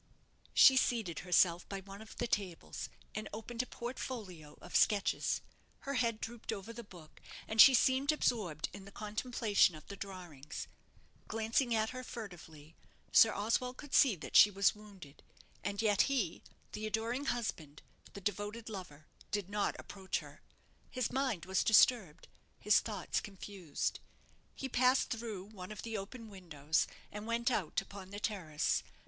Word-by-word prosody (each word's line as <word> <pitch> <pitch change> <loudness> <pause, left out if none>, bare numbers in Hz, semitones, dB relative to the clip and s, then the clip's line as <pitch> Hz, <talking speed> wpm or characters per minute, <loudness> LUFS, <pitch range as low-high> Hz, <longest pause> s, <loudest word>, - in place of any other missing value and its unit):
She 265 - +8
seated 225 - +1
herself 175 -1 +3
by 195 -1 -4
one 195 +2 -11
of 220 - -11
the 240 - -2
tables, 195 -7 -3 0.2
and 215 0 -5
opened 230 +3 -4
a 250 - -7
portfolio 210 - -6
of - - -10
sketches. 205 -2 +2 0.4
Her 275 - -4
head 230 -4 +1
drooped 235 0 -5
over 220 +1 -6
the 235 +1 -8
book, 170 -6 -15 0.3
and 220 0 +6
she 265 +2 +10
seemed 260 +3 +3
absorbed 205 - 0
in 195 - -9
the 200 - -12
contemplation 215 -3 +1
of 155 - -12
the 200 - -8
drawings. 180 -8 -7 0.6
Glancing 225 +2 +1
at 220 0 +1
her 255 0 -6
furtively, 165 - -9 0.4
Sir 225 - +7
Oswald 230 +5 -1
could 290 -2 -10
see 255 -7 +6
that 165 - -9
she 210 - +10
was 200 0 +3
wounded; 200 -9 -14 0.4
and 205 +1 -2
yet 210 -2 +4
he 245 -11 -1 0.3
the 215 0 -4
adoring 230 +5 -1
husband, 180 - -3 0.3
the 200 - -8
devoted 205 +4 -3
lover 180 -8 -8 0.2
did 205 -2 -3
not 205 0 0
approach 190 -2 -4
her. - - -10 0.5
His 255 -3 -2
mind 255 - -1
was 190 0 +1
disturbed 220 -7 +4 0.3
his - - +5
thoughts - - -3
confused. 195 -5 -4 0.6
He 270 - -4
passed 255 +1 +3
through 225 -5 -4
one 190 -2 -9
of 210 - -7
the 225 -1 -4
open 220 +4 -6
windows, 160 -6 -1 0.2
and 210 +1 -7
went 235 +2 +1
out 195 -8 0
upon 195 -1 -10
the 205 +1 -6
terrace. 175 -9 0
210 Hz, 155 wpm, -34 LUFS, 185-235 Hz, 0.6 s, she